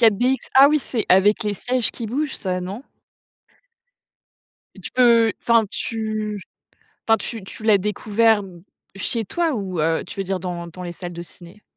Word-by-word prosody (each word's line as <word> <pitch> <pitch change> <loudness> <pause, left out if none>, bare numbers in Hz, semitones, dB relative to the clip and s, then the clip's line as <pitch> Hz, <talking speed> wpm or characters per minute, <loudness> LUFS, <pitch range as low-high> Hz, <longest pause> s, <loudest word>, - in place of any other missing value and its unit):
4DX? 240 +3 +4 0.2
Ah 270 +1 +8
oui, 305 +1 +3
c'est 235 -4 -3
avec 205 +4 +4
les 210 -1 -1
sièges 245 +3 0
qui 235 - -5
bougent 275 +5 -2
ça, 185 -2 -2
non? 195 +7 -6 1.9
Et - - -12
tu - - -7
peux 235 -3 +5
enfin 230 -2 +3
tu 215 -2 -3 0.7
enfin 225 - +6
tu 225 -3 -4
tu 215 - -10
l'as 215 -2 +5
découvert 210 +2 +2
d 175 -3 -13 0.3
chez 220 +4 -2
toi 335 - 0
ou, 190 -6 -3
heu, 160 +1 +1
tu - - -6
veux - - -1
dire 190 0 -2
dans 175 -1 -5
dans 180 +2 -10
les 175 - -5
salles 175 0 -7
de 170 - -6
ciné? 175 +3 -11
210 Hz, 180 wpm, -22 LUFS, 185-230 Hz, 1.9 s, Ah